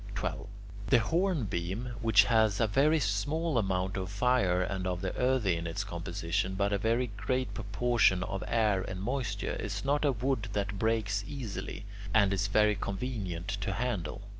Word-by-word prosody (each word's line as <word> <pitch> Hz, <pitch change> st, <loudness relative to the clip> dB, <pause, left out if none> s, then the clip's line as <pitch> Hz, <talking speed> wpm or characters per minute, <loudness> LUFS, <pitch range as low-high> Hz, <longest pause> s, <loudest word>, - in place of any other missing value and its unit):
12. -, -, -3 dB, 0.4 s
The 130 Hz, -, +6 dB
hornbeam, 120 Hz, -, -1 dB
which 110 Hz, -3 st, +6 dB
has 110 Hz, -1 st, +3 dB
a 115 Hz, -, +4 dB
very 140 Hz, +9 st, +3 dB
small 145 Hz, +7 st, 0 dB
amount 95 Hz, -1 st, -1 dB
of 95 Hz, -1 st, -3 dB
fire 100 Hz, -4 st, +2 dB
and 95 Hz, -1 st, -3 dB
of 90 Hz, -1 st, -1 dB
the 95 Hz, -2 st, -3 dB
earthy 125 Hz, -8 st, +2 dB
in 85 Hz, 0 st, -4 dB
its 80 Hz, -, -2 dB
composition, 90 Hz, +3 st, -2 dB
but 100 Hz, +1 st, +1 dB
a 100 Hz, -, +1 dB
very 115 Hz, +3 st, +1 dB
great 125 Hz, +5 st, -1 dB
proportion 120 Hz, -7 st, +2 dB
of 95 Hz, +1 st, -4 dB
air 105 Hz, -4 st, +2 dB
and 95 Hz, 0 st, -5 dB
moisture, 110 Hz, -2 st, -2 dB
is 100 Hz, +1 st, -4 dB
not 145 Hz, +2 st, +2 dB
a 145 Hz, -, +4 dB
wood 125 Hz, -2 st, -1 dB
that 100 Hz, -1 st, -2 dB
breaks 110 Hz, -2 st, 0 dB
easily, 115 Hz, -5 st, -6 dB, 0.3 s
and 100 Hz, -3 st, +5 dB
is 100 Hz, +1 st, 0 dB
very 105 Hz, +1 st, +4 dB
convenient 100 Hz, -4 st, -4 dB
to 95 Hz, -1 st, -2 dB
handle. 105 Hz, -5 st, -3 dB
105 Hz, 165 wpm, -30 LUFS, 95-125 Hz, 0.4 s, The